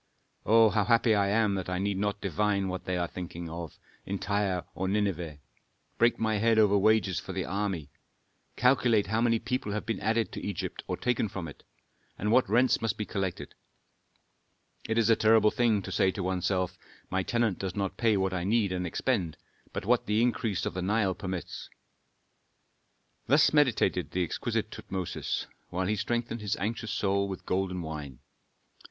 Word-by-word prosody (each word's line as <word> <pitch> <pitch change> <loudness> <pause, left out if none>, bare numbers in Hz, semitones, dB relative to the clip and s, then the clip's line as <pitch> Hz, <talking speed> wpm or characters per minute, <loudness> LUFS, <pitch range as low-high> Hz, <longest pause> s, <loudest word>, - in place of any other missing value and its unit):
Oh, 115 0 +6
how 105 +1 +2
happy 115 -1 +4
I 100 -1 +2
am 105 0 +2
that 95 -2 -3
I 90 - -1
need 100 0 -1
not 105 0 -1
divine 100 +1 0
what 90 0 -5
they 90 -1 -1
are 85 -1 0
thinking 85 -1 -7
of 85 -1 -7 0.3
in 100 - -3
Tyre 100 -3 -1
or 95 - -2
Nineveh; 95 -6 -1 0.6
break 120 +1 +4
my 110 -2 0
head 115 +1 +3
over 105 -2 +5
wages 100 -3 +3
for - - -7
the - - -2
army; 95 -6 -3 0.6
calculate 125 -4 +3
how 110 +3 0
many 115 -1 +3
people 120 -2 -3
have 105 - -3
been 115 - -2
added 115 +2 0
to - - -6
Egypt 100 -4 -4
or - - -2
taken 125 -3 0
from 90 -3 -5
it, 75 - -11 0.6
and 105 +2 -1
what 125 -1 +4
rents 120 +3 +3
must 115 -2 -1
be 105 - -3
collected. 95 -4 -4 1.3
It 110 - -1
is 115 -2 +3
a - - +6
terrible 110 -1 +4
thing 115 -5 +2
to 95 - -6
say 95 0 +3
to 100 - -4
one's 90 -1 -1
self, 95 -2 -1 0.3
'My 95 0 +1
tenant 115 -1 0
does 95 -2 -4
not 100 -2 -2
pay 110 -3 +3
what 95 -1 0
I 90 -1 -2
need 105 0 +2
and 90 -1 -2
expend, 90 - -1 0.3
but - - -5
what 120 +3 +2
the 105 +2 +2
increase 115 -5 0
of - - -2
the 90 - -3
Nile 100 0 +1
permits.'" 95 -1 -6 1.6
Thus 145 +4 +5
meditated 120 - +2
the 90 - 0
exquisite 85 - -2
Tutmosis, 95 -2 -4 0.2
while 90 +1 -2
he 105 +3 +1
strengthened 120 +2 -2
his 105 -2 -1
anxious 110 +2 -3
soul 100 0 0
with 95 -1 -7
golden 90 -1 -1
wine. 75 -5 -6
100 Hz, 185 wpm, -29 LUFS, 95-110 Hz, 1.6 s, Oh